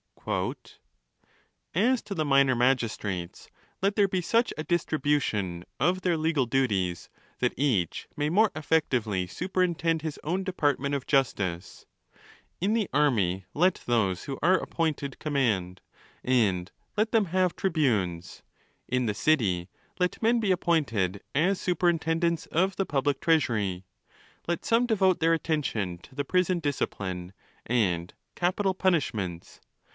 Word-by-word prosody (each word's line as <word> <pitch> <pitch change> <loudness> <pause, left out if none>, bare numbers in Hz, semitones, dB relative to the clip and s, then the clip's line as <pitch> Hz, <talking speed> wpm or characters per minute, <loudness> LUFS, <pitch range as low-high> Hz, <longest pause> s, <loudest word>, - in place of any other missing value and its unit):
7 - - -1 1.2
"As 235 +7 +3
to 200 - -5
the 155 -3 0
minor 135 -2 +4
magistrates, 115 -8 -1 0.3
let 200 +2 +1
there 205 -2 +4
be 185 -1 -1
such 230 +7 +2
a 155 - -3
distribu 155 -3 +1
tion 90 -8 -3 0.2
of 180 +5 +2
their 175 -2 +1
legal 155 -4 +1
duties, 105 -9 0 0.3
that - - +1
each 115 - 0
may 145 0 0
more 210 +5 +4
effectively 125 - 0
superintend 170 - 0
his 155 -1 -5
own 180 +5 -1
department 145 -6 0
of 140 -1 -4
justice. 100 - -1 0.7
In 195 +5 +1
the 225 -4 0
army 105 -11 +2
let 180 +4 +2
those 105 -7 +1
who 135 - -5
are 185 +4 +4
appointed 155 -6 -2
command, 105 - 0 0.4
and 100 -8 +1 0.2
let 215 +1 +1
them 220 -3 +3
have 185 0 +1
tri 190 - -1
bunes. 105 - -1 0.5
In 125 -1 0
the 105 - -1
city, 100 - +1 0.3
let 180 0 0
men 230 +1 +3
be 210 -4 +1
appointed 115 - 0
as 180 +6 +2
superintendents 170 -1 +1
of 190 +4 +1
the 195 - 0
public 140 -2 0
treasury. 105 - +1 0.6
Let 170 0 -2
some 230 +2 +3
devote 190 -6 +2
their 165 +1 +3
attention 140 - -1
to 130 - -17
the 145 0 -2
prison 180 +2 +1
discipline, 95 - -3 0.3
and 90 -8 0 0.2
capital 190 +2 +1
punishments. 115 - -1
145 Hz, 135 wpm, -27 LUFS, 105-180 Hz, 1.2 s, minor